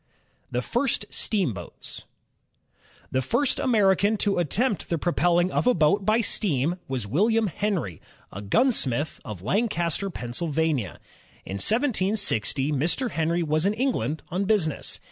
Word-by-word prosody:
The 125 Hz, +1 st, -2 dB
First 240 Hz, -, 0 dB
Steamboats 125 Hz, -, -3 dB, 1.1 s
The 130 Hz, -, +1 dB
first 255 Hz, -, +1 dB
American 205 Hz, -2 st, +3 dB
to 200 Hz, -2 st, +1 dB
attempt 200 Hz, -, 0 dB
the 170 Hz, -, 0 dB
propelling 175 Hz, +2 st, +2 dB
of -, -, 0 dB
a 250 Hz, -, +5 dB
boat 175 Hz, +6 st, +2 dB
by 220 Hz, +2 st, +4 dB
steam 175 Hz, -, 0 dB
was 130 Hz, -5 st, -3 dB
William 215 Hz, -, +2 dB
Henry, 190 Hz, -, -2 dB, 0.3 s
a 100 Hz, -, -7 dB
gunsmith 145 Hz, -, +1 dB
of 105 Hz, -, -8 dB
Lan 210 Hz, -, +1 dB
caster, 175 Hz, 0 st, -1 dB
Pennsylvania, 150 Hz, -, -2 dB, 0.5 s
tn -, -, -8 dB
1760, 200 Hz, -, +1 dB
Mr. 165 Hz, -, 0 dB
Henry 165 Hz, +2 st, 0 dB
was 155 Hz, +3 st, +1 dB
in 205 Hz, -, 0 dB
England 230 Hz, -, -1 dB
on 185 Hz, +3 st, -1 dB
business. 190 Hz, -8 st, 0 dB
175 Hz, 130 wpm, -25 LUFS, 145-215 Hz, 1.1 s, a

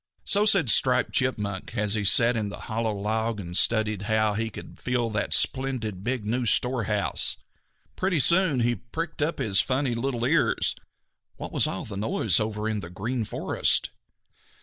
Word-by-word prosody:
So 205 Hz, +1 st, +3 dB
said 175 Hz, -, +4 dB
Striped -, -, +2 dB
Chipmunk, 105 Hz, -7 st, -2 dB
as 105 Hz, -1 st, +1 dB
he 110 Hz, -2 st, 0 dB
sat 115 Hz, +4 st, +4 dB
in 105 Hz, -2 st, -2 dB
the -, -, -9 dB
hollow 115 Hz, 0 st, -2 dB
log 110 Hz, +2 st, -2 dB
and 90 Hz, -2 st, -7 dB
studied 110 Hz, -1 st, +2 dB
how 110 Hz, -1 st, +2 dB
he 110 Hz, +2 st, -2 dB
could -, -, -11 dB
fill 120 Hz, -2 st, -1 dB
that 105 Hz, -1 st, -2 dB
splendid 125 Hz, -8 st, +1 dB
big 125 Hz, -1 st, -2 dB
new 120 Hz, +3 st, -1 dB
storehouse. 110 Hz, -3 st, 0 dB, 0.6 s
Pretty 185 Hz, -3 st, 0 dB
soon 170 Hz, -3 st, +4 dB
he 120 Hz, +1 st, +2 dB
pricked 155 Hz, -, -6 dB
up 155 Hz, +3 st, 0 dB
his 105 Hz, -8 st, +2 dB
funny 130 Hz, -1 st, -1 dB
little 120 Hz, 0 st, -2 dB
ears. 150 Hz, +4 st, +2 dB, 0.6 s
What -, -, -7 dB
was -, -, +2 dB
all 95 Hz, -, -4 dB
that 100 Hz, -2 st, -7 dB
noise 105 Hz, -2 st, +1 dB
over 110 Hz, 0 st, -2 dB
in 110 Hz, -1 st, -1 dB
the 85 Hz, -, -8 dB
Green 110 Hz, +6 st, -3 dB
Forest? -, -, 0 dB
115 Hz, 170 wpm, -26 LUFS, 105-130 Hz, 0.6 s, said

